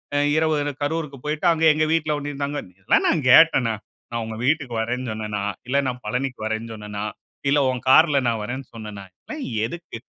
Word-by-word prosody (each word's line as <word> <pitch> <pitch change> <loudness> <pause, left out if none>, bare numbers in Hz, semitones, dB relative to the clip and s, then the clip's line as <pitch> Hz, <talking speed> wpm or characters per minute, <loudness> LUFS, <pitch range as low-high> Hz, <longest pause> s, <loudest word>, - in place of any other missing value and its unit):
அ - - +3 0.2
இரவு 155 -1 +2 0.3
கரூருக்கு 150 -2 -2
போய்ட்டு, 155 +4 -2
அங்க 160 0 -2
எங்க 155 0 +2
வீட்ல 155 -2 +1
ஒன்னய 145 0 -5
தங்க" 145 +1 -3 0.2
இதெல்லாம் 95 - +2
நான் 155 -5 +1
கேட்டனா? 130 -9 +6 0.4
நான் 115 0 -2
உங்க 110 0 -6
வீட்டுக்கு 145 -4 +1
வரேன்னு 125 +2 -2
சொன்னேனா? 105 -2 -3 0.3
இல்ல 140 +2 +1
நான் 125 0 -3
பழனிக்கு 125 +3 -2
வரறேன்னு 110 +1 -3
சொன்னேனா? 105 -1 -6 0.5
இல்ல 145 +1 +4
உன் 130 -1 -2
கார்ல 150 +1 +6
நான் 115 -1 0
வரறேன்னு 130 +5 -5
சொன்னேனா? 105 -3 -8 0.2
எல்லாம் 310 -3 -7 0.2
எதுக்கு? 170 -1 -7
130 Hz, 180 wpm, -23 LUFS, 115-150 Hz, 0.5 s, கேட்டனா